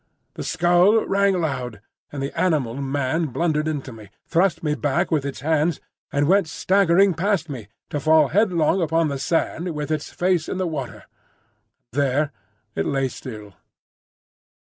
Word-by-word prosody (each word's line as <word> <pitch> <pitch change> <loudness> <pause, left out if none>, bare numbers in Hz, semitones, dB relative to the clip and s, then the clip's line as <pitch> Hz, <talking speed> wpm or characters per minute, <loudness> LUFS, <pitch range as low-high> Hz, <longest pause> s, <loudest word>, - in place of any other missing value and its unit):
The - - -7
skull 175 +6 +3
rang 195 -1 +2
loud, 125 -9 -3 0.3
and 140 -2 -4
the 140 - -5
animal 150 -10 +1
man 140 +4 -1
blundered 150 +3 0
into 145 -4 -3
me, 110 -3 -12 0.2
thrust 175 -1 +1
me 150 -2 +1
back 145 -2 0
with 155 -4 +1
its 140 -2 -5
hands, 155 +1 +1 0.3
and 145 0 +1
went 195 0 +4
staggering 190 +3 +3
past 180 0 0
me 120 -7 -7 0.2
to 145 - -1
fall 155 0 +4
headlong 185 -2 +2
upon 165 -1 +1
the 140 -1 -3
sand 165 +3 -1
with 150 +1 -4
its 155 -1 -2
face 180 -3 0
in - - -3
the 185 - -1
water; 145 -7 -5 0.9
and 145 - +1
there 140 +2 +1 0.4
it 80 - -1
lay 135 -1 0
still. 105 -5 -9
155 Hz, 160 wpm, -23 LUFS, 140-175 Hz, 0.9 s, went